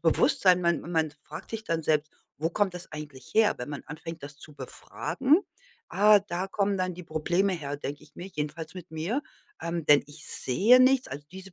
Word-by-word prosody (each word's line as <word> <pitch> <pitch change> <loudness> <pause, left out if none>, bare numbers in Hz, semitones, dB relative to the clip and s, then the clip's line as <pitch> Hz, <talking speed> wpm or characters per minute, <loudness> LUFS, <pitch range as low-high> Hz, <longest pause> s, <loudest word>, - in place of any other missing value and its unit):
Bewusstsein, 180 - +4
man 170 -1 +2
man 160 -2 0
fragt - - -9
sich 225 -1 -4
dann 165 -5 -1
selbst: 155 0 +1 0.3
Wo 160 +3 0
kommt 200 +1 +1
das 180 - -9
eigentlich 145 -4 -9
her, 220 -1 +5
wenn 125 - -5
man 145 - -6
anfängt, 160 +2 -8
das 145 +1 -9
zu 150 +1 -13
befragen? 275 - 0 0.5
Ah, 210 +1 +6
da 185 -1 -3
kommen 200 0 0
dann 185 -1 -1
die 180 - -9
Probleme 175 +5 0
her“, 145 -5 -4
denke 145 0 -6
ich - - -24
mir 175 - -7
jedenfalls 160 -1 -5
mit 180 -1 -10
mir, 170 - -2 0.4
ähm, 170 -1 -3
denn 145 -1 +6
ich 150 +2 -7
sehe 215 - +4
nichts 260 0 +4
also, 145 +2 -8
diese 190 0 -10
170 Hz, 200 wpm, -28 LUFS, 150-195 Hz, 0.5 s, Ah